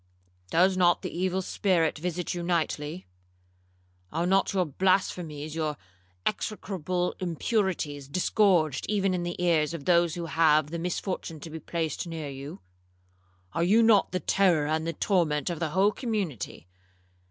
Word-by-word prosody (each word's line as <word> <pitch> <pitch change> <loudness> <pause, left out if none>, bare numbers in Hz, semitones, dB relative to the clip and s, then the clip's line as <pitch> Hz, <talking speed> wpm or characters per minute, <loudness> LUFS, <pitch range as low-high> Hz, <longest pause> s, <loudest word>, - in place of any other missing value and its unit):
'—'Does 185 +3 +4
not 175 -1 +3
the - - -5
evil 185 +1 0
spirit 175 -5 +1
visit 175 +2 -3
you 175 - -4
nightly? 170 -1 -2 1.1
Are 165 +2 -1
not 190 +2 +2
your 185 -2 +1
blasphemies, 155 -2 0
your 155 -2 -2 0.5
execrable 185 -4 -2
impurities, 170 - -1
disgorged 175 -2 +2
even 195 -2 +1
in 180 - -1
the 175 0 -4
ears 165 -2 +2
of 145 - -8
those 170 -2 +3
who 170 -1 -4
have 155 -2 +3
the 170 - -3
misfortune 175 -2 -3
to 165 - -8
be 160 - -6
placed 160 +1 -3
near 160 -3 -5
you? 135 -6 -8 0.9
Are 165 - 0
you 215 +6 +5
not 220 -3 +4
the 185 - -1
terror 180 -6 +2
and 160 +2 -1
the 165 - -1
torment 165 -7 +1
of 170 - -4
the 160 - -1
whole 190 +6 +3
community?' 195 - -4
170 Hz, 150 wpm, -27 LUFS, 155-185 Hz, 1.1 s, you